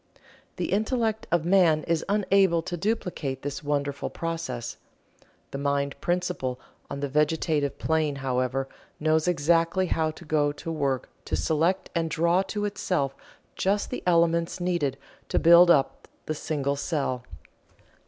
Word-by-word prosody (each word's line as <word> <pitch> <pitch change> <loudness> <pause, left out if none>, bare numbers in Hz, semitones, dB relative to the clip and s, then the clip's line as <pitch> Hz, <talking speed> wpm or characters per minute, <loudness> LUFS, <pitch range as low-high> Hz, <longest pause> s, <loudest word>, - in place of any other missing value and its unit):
The - - -3
intellect 220 +1 0
of 170 -2 +2
man 175 -4 +4
is 165 -1 0
unable 195 -4 +3
to 175 - -4
duplicate 175 - -2
this 145 0 -4
wonderful 145 -1 -2
process. 145 -8 -4 0.7
The 140 - -4
Mind 140 0 0
Principle 175 -8 -1 0.3
on 140 - -5
the 145 - 0
Vegetative 150 0 +1
Plane, 155 -2 0
however, 130 0 -1 0.3
knows 155 +1 +2
exactly 170 +2 +2
how 160 -2 0
to 160 +2 -10
go 150 -1 +2
to 165 +3 -6
work 140 -5 -1 0.2
to - - -1
select 160 - 0
and 165 -1 0
draw 170 +4 +2
to 205 +1 -3
itself 180 -9 -1 0.4
just 200 +2 0
the 250 - -3
elements 170 0 +2
needed 170 -7 0 0.3
to - - 0
build 170 +1 +7
up 135 -5 +2 0.2
the 155 - -2
single 140 -2 -2
cell. 140 -5 -2
160 Hz, 140 wpm, -26 LUFS, 140-175 Hz, 0.7 s, build